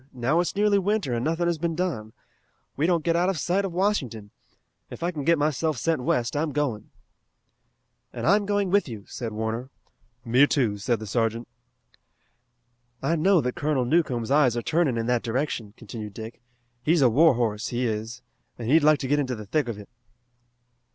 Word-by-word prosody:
Now 130 +6 +1
it's 175 - -1
nearly 205 0 +3
winter, 200 - 0
and 120 0 -1
nothing 165 +3 0
has 170 -2 0
been 165 0 -1
done. 150 -12 -3 0.6
We 150 +4 +1
don't 170 -3 +1
get 165 0 +1
out 175 +2 +2
of 190 - -1
sight 180 +6 0
of 190 - -3
Washington. 140 - -1 0.6
If - - -8
I 175 - 0
can 150 -5 -5
get 170 +3 +3
myself 155 +1 0
sent 165 -5 0
west 120 0 0
I'm 150 0 -1
going." 135 -8 -2 1.2
"And - - -5
I'm 205 0 +3
going 205 -2 0
with 200 -3 +3
you," 110 -4 -8
said 115 -2 -5
Warner. 110 +4 -3 0.6
"Me, 125 +5 +5
too," 115 -9 0
said 115 +2 0
the 110 - -7
sergeant. 115 +2 -1 1.6
"I 165 - +1
know 175 +2 +3
that 125 0 -2
Colonel 145 -4 0
Newcomb's 125 -6 0
eyes 135 -5 +4
are 120 - -2
turning 155 -7 +1
in 115 - -1
that 120 0 +1
direction," 115 -4 -3
continued 105 -2 -8
Dick. 110 +2 -8 0.4
"He's 155 +2 +3
a - - +7
war 155 +3 +5
horse, 110 -1 -1
he 125 +1 -1
is, 115 +2 -4 0.3
and 115 - -6
he'd 155 +4 +4
like 155 0 +5
to 135 - -3
get 145 +2 +2
into 130 -3 -1
the 105 -1 -8
thick 145 +7 0
of 115 -3 -4
it." 105 -1 -11
135 Hz, 190 wpm, -25 LUFS, 115-165 Hz, 1.6 s, a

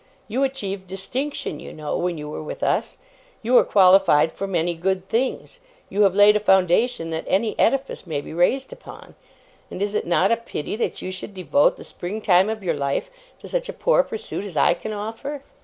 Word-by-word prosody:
You 240 +5 -2
achieved 200 -9 -3
distinction, 195 - -4
you - - -9
know, 150 -1 -4
when 175 -1 -1
you 150 0 -6
were 150 - -6
with 155 - -7
us. - - 0 0.5
You 245 +3 +2
are - - +4
qualified 185 -5 +5
for 195 - -5
many 175 -2 0
good 185 +2 -2
things. 260 - -2 0.3
You 205 - 0
have 195 -1 +2
laid 205 +1 +7
a - - +3
foundation 190 -1 +2
that 160 0 -3
any 215 +3 +1
edifice 270 -5 0
may 155 -3 -2
be 145 - -9
raised 250 +11 +1
upon; - - -13 0.6
and - - -7
is 205 +1 -1
it - - -1
not 180 +4 +3
a 230 - +3
pity 220 -7 -5
that 235 - -3
you 185 - -4
should 185 +2 -8
devote 150 -6 +2
the - - -10
spring 190 +5 -6
time 190 -1 +4
of 220 -2 -4
your 170 -3 0
life 140 - -2 0.3
to - - -9
such - - -2
a - - -4
poor - - +3
pursuit 450 - -6
as 190 -7 -7
I 140 - +5
can 215 +5 -7
offer? 225 +7 -5
195 Hz, 205 wpm, -23 LUFS, 175-230 Hz, 0.6 s, laid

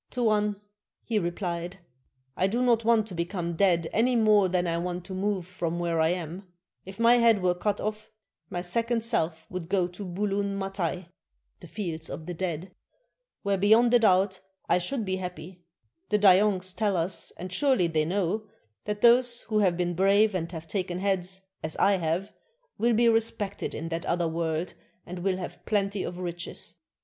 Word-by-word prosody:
"Tuan," 210 -4 +1 0.4
he 225 -3 0
repHed, 175 0 -3 0.6
"I 185 - +2
do 235 +5 0
not 235 -2 +3
want 225 -1 +3
to 205 - -10
become 170 0 -3
dead 170 -2 +2
any 245 +3 +2
more 210 -4 +4
than 180 0 +1
I 170 -1 0
want 175 0 -4
to 190 - -7
move 190 -1 -1
from 170 -2 -3
where 170 -2 0
I 160 - +4
am; 180 +2 -4 0.4
if 190 +2 -10
my 235 +1 +6
head 225 -5 +4
were 180 -1 +3
cut 200 +3 -1
off, 215 0 -4 0.4
my 175 - -3
second 230 +6 0
self 165 -8 0
would 180 -2 -5
go 185 -3 +2
to 180 +3 -8
Bulun 200 +2 -2
Matai 190 -3 -3 0.5
[the - - -12
"Fields 165 -6 -5
of 155 +2 -7
the 175 - -5
Dead"], 175 0 -4 0.7
where 200 -1 0
beyond 225 +4 +5
a 245 - +7
doubt 190 -3 +3 0.3
I - - +3
should 220 +6 -3
be 190 -1 -1
happy; 180 -1 -7 0.5
the 210 - +3
Dayongs 190 -2 +4
tell 205 -4 +1
us, 170 +2 -2
and 185 +1 -7
surely 265 -6 +3
they 160 -2 +1
know, 195 +5 -1 0.4
that 210 0 -3
those 240 0 +5
who 215 -1 -1
have 185 -4 +2
been 175 -1 0
brave 200 +4 +4
and 170 -2 -3
have 165 -2 -7
taken 180 +1 -2
heads, 190 0 -1 0.2
as 160 0 -4
I 200 0 +4
have, 175 +4 -2 0.5
will 235 +1 +3
be 235 +1 +4
respected 225 -3 0
in 165 +2 -5
that 165 0 -4
other 170 -1 +1
world 165 +1 -2 0.3
and 180 +1 -7
will 185 +1 0
have 185 - -7
plenty 200 -2 0
of 175 0 -5
riches. 175 -1 -6
185 Hz, 180 wpm, -27 LUFS, 175-210 Hz, 0.7 s, a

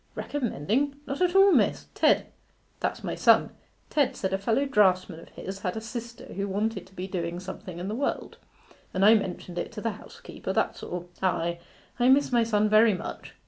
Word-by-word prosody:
'Recommending? 265 - -1
Not 280 +4 -4
at 360 0 +2
all, 390 0 +7
miss. - - +2
Ted - - +3 0.5
that's - - -2
my - - -3
son - - +4 0.4
Ted 275 -4 +2
said 190 -1 -2
a 195 - 0
fellow 230 +7 +1
draughtsman 185 -9 +2
of - - -14
his 195 +1 -7
had 180 +1 -3
a - - -1
sister 235 +1 -8
who 200 +1 -2
wanted 210 +4 -2
to 190 - -21
be 185 - -4
doing 175 -2 -3
something 185 -1 -8
in 180 +2 -5
the 210 - -3
world, 270 +5 -3 0.6
and 190 +1 +3
I 215 - +9
mentioned 185 -4 -2
it - - -4
to 210 - -6
the 230 - -1
housekeeper, - - -8
that's - - 0
all. 175 0 -6
Ay, 170 -2 0 0.4
I 245 +1 +4
miss 275 +1 +4
my 240 -1 +4
son 215 -2 +2
very 215 0 +5
much. 180 - -8
210 Hz, 195 wpm, -27 LUFS, 185-240 Hz, 0.6 s, I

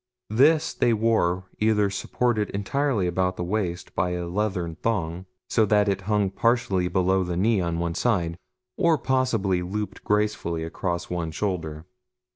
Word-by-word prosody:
This 150 +7 +4
they 120 - +2
wore 105 -5 +1 0.2
either 105 -2 +2
supported 110 +1 0
entirely 110 +2 0
about 90 +1 0
the - - -2
waist 90 -2 -3
by 90 0 0
a 90 0 -3
leathern 90 -3 -1
thong, 90 -5 -2 0.2
so 110 - +3
that 105 0 +3
it 100 -1 0
hung 105 -3 +2
partially 115 -5 +1
below 95 +1 +2
the 90 -1 -3
knee 105 +1 +2
on 85 -1 -1
one 85 0 -1
side, 85 -6 0 0.4
or 170 -4 +3
possibly 115 -10 +1
looped 105 +4 -4
gracefully 105 -6 0
across 85 +1 -3
one 85 -2 -2
shoulder. 80 -3 -3
95 Hz, 150 wpm, -25 LUFS, 90-110 Hz, 0.4 s, This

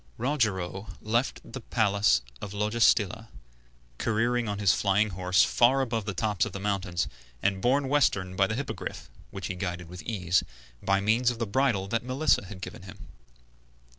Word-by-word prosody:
Rogero 105 -7 -1
left 115 +4 -1
the 130 - -8
palace 100 - +2 0.2
of 100 - -6
Logestilla, 110 0 +2 0.7
careering 120 +1 +1
on 100 - -2
his 100 -2 +4
flying 105 +1 +2
courser 90 0 +3
far 130 +3 +4
above 115 -5 -2
the 100 -3 -4
tops 105 +1 0
of 110 -5 -3
the 100 - -5
mountains, 95 -4 -1 0.4
and 95 -1 +1
borne 135 +4 +2
westward 100 -10 +1
by 95 0 +3
the 110 - -2
Hippogriff, 140 +2 -5 0.2
which 95 - -7
he 95 - -3
guided 90 -2 -4
with 90 0 -8
ease, 90 -5 0 0.4
by 100 0 +2
means 115 +4 +3
of 120 - -3
the 115 - -1
bridle 115 -4 +1
that 115 +2 0
Melissa 130 -2 +1
had 95 0 -10
given - - -7
him. 90 -2 -12
105 Hz, 165 wpm, -28 LUFS, 95-120 Hz, 0.7 s, his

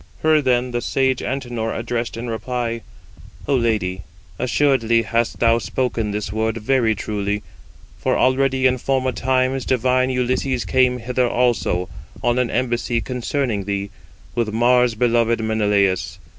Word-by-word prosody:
Her 155 -1 +4
then 125 -2 +1
the 120 0 -2
sage 130 0 +1
Antenor 120 -4 -3
addressed 120 -1 -3
in 120 +1 -5
reply: 115 +1 -3 0.7
"O 140 - +1
lady, 105 -7 0 0.4
assuredly 120 -3 +2
hast 115 +1 -1
thou 115 0 +4
spoken 115 +1 -2
this 105 -1 -3
word 110 +1 -1
very 115 -1 +1
truly: 105 0 -3 0.6
for - - +1
already 130 0 +2
in 130 -1 +3
former 130 0 0
times 130 +1 0
divine 130 +1 +1
Ulysses 125 0 0
came 125 -1 +3
hither 125 +1 0
also, 115 -8 +1 0.4
on 120 +1 +2
an 125 -2 +1
embassy 120 -1 0
concerning 125 -4 -2
thee, 100 0 -3 0.4
with 115 -2 -1
Mars 120 +1 +3
beloved 115 0 +2
Menelaus. 100 -5 +1
120 Hz, 135 wpm, -21 LUFS, 110-130 Hz, 0.7 s, Her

